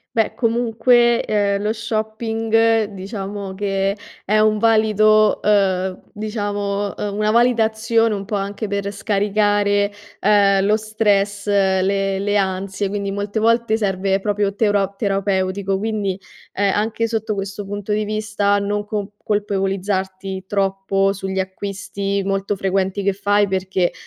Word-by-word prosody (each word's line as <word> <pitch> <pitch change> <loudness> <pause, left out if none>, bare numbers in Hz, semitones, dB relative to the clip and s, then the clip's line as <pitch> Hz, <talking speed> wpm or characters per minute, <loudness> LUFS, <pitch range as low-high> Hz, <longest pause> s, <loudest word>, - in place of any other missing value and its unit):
Beh 225 -2 +1
comunque, 235 0 +2
ehm, 200 -1 0
lo 215 +1 0
shopping 225 0 0
diciamo 195 0 -6
che 195 0 -1 0.3
è 210 +2 +1
un 215 0 +3
valido, 215 -1 +4
ehm, 190 -3 +1
diciamo, 205 -2 -3
ehm, 205 -1 -4
una 215 0 +1
valida 235 0 +4
azione 225 +1 +1
un 200 -1 -3
po' 205 +2 -4
anche 200 +2 -3
per 200 0 -2
scaricare, 205 0 +1 0.3
ehm, 200 -1 +4
lo 215 +1 +3
stress, 205 -2 0
le 195 0 +1
le 205 +1 +1
ansie, 190 +1 -1
quindi 200 0 -3
molte 205 +2 -2
volte 230 0 +2
serve 195 -2 0
proprio 205 0 0
teuro 200 -2 +1
terapeutico, 195 -1 -1
quindi, 205 -3 -2 0.3
ehm, 200 0 +1
anche 220 +2 0
sotto 220 -1 -2
questo 200 +1 -5
punto 205 +1 -5
di 210 0 0
vista 215 -1 0
non 205 +1 -2
con 210 -1 -3 0.2
colpevolizzarti 195 -2 -2
troppo 195 0 0
sugli 190 -1 -4
acquisti 200 +1 -3
molto 195 +1 -1
frequenti 190 +1 0
che 200 0 +2
fai 205 +1 +2
perché 190 -1 0
205 Hz, 130 wpm, -20 LUFS, 195-215 Hz, 0.3 s, valido